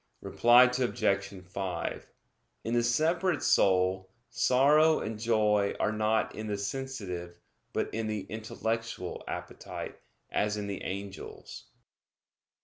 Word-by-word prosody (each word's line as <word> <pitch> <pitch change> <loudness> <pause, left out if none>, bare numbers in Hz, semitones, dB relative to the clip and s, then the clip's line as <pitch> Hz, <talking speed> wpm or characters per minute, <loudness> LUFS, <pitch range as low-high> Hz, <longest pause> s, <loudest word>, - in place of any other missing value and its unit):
Reply 120 +1 +6
Obj. 120 -6 +1
5: 95 0 -4 0.6
In 115 - -2
the 120 - +3
separate 160 +7 +1
soul, 95 0 +3 0.2
sorrow 150 +5 +4
and 110 0 -4
joy 105 -3 +2
are 105 - +1
not 110 +1 +1
in 110 0 -6
the 105 -1 -2
sensitive, 100 -7 -5 0.3
but - - -2
in 110 0 -2
the 105 -1 -2
intellectual 110 -1 -4
appetite, - - -6 0.3
as 105 +1 0
in 105 - -3
the 100 -1 -5
angels. 100 +1 -7
110 Hz, 115 wpm, -30 LUFS, 100-120 Hz, 0.6 s, Reply